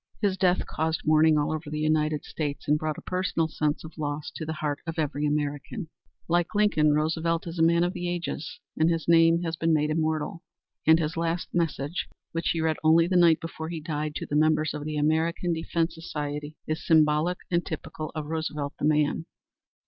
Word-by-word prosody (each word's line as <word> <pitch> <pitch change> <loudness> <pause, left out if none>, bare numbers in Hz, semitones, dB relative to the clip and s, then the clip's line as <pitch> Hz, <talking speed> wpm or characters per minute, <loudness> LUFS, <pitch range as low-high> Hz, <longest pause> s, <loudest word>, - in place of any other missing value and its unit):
His 200 -3 +1
death 185 -1 +2
caused 160 0 -2
mourning 155 0 +5
all 145 0 +1
over 155 -1 -4
the 150 - -4
United 155 -1 +1
States 145 -3 -4
and 150 +1 +3
brought 155 -1 -2
a - - -8
personal 180 -3 0
sense 150 -1 -1
of 160 0 -11
loss 145 0 -3
to 160 - -6
the 160 - -2
heart 150 -2 -2
of 165 +1 -4
every 150 -1 0
true - - +1
American. 150 - -3 0.4
Like 175 +4 +1
Lincoln, 155 -8 +3
Roosevelt 160 +2 0
is 170 0 -6
a - - +3
man 170 +1 +4
of 175 +1 0
the 180 -2 -3
ages, 170 -3 -4 0.2
and 160 +1 +3
his 165 -1 -1
name 165 0 +5
has 165 -1 -2
been 165 0 +2
made 150 0 +1
immortal. 155 +1 -1 0.5
And 160 0 +8
his 160 0 -2
last 165 +1 -1
message, 165 -2 -1 0.2
which 165 0 -1
he 165 - 0
read 160 -1 +1
only 160 +1 +6
the 180 +2 -1
night 170 -2 +6
before 160 -1 -6
he 170 -1 -4
died, 150 -1 -3
to - - -3
the 145 - -3
members 155 0 +3
of 150 -1 -5
the 155 0 -3
American 160 +3 +1
Defense 165 0 -1
Society, 150 -2 -5
is 155 +1 -3
symbolic 155 +2 +3
and 170 0 +2
typical 155 -2 -6
of 155 -1 -3
Roosevelt 150 -2 -3
the - - 0
man. 150 +2 +1
160 Hz, 205 wpm, -27 LUFS, 150-165 Hz, 0.5 s, And